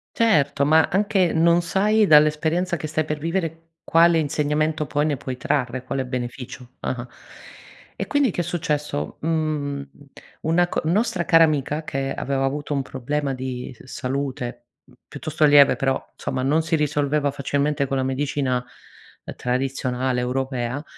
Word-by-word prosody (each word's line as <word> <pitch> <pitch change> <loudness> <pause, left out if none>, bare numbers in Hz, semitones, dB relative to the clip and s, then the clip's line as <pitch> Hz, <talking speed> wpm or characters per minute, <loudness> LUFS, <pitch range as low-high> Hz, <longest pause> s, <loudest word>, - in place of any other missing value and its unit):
Certo, 145 -11 +3
ma 160 +1 +5
anche 190 -2 +2
non 170 +1 +4
sai 210 +4 +2
dall'esperienza 155 +3 +3
che 155 - -5
stai 155 0 -1
per 150 - -2
vivere 165 0 -3
quale 165 0 +4
insegnamento 150 +1 0
poi 145 +2 0
ne 145 - 0
puoi 130 -1 -6
trarre, 130 -2 -1
quale 135 0 -2
beneficio. 125 0 -6
Ah-ah, 125 -1 -4 0.9
e - - -3
quindi 285 -4 +2
che 175 - -2
è - - -7
successo, 150 - -2
mhmm, 150 -3 -1 0.5
una 175 +2 +2
co - - -2
nostra 185 0 +1
cara 165 -1 +6
amica, 150 0 0
che 135 -1 -2
aveva 135 0 -2
avuto 145 +2 -2
un 140 - 0
problema 135 +2 -3
di 130 -1 -5
s - - -17
salute, 130 -2 -4 0.2
mh, 135 - -23 0.2
piuttosto 155 +1 0
lieve 145 -1 +6
però, 135 -1 0 0.2
insomma 130 - -3
non 145 +5 +2
si 160 +1 0
risolveva 150 -1 0
facilmente 140 +1 -1
con 135 0 -2
la 130 - +1
medicina 130 -1 -1 0.7
tradizionale 130 0 -1
europea 130 +2 -2
145 Hz, 150 wpm, -23 LUFS, 130-160 Hz, 0.9 s, cara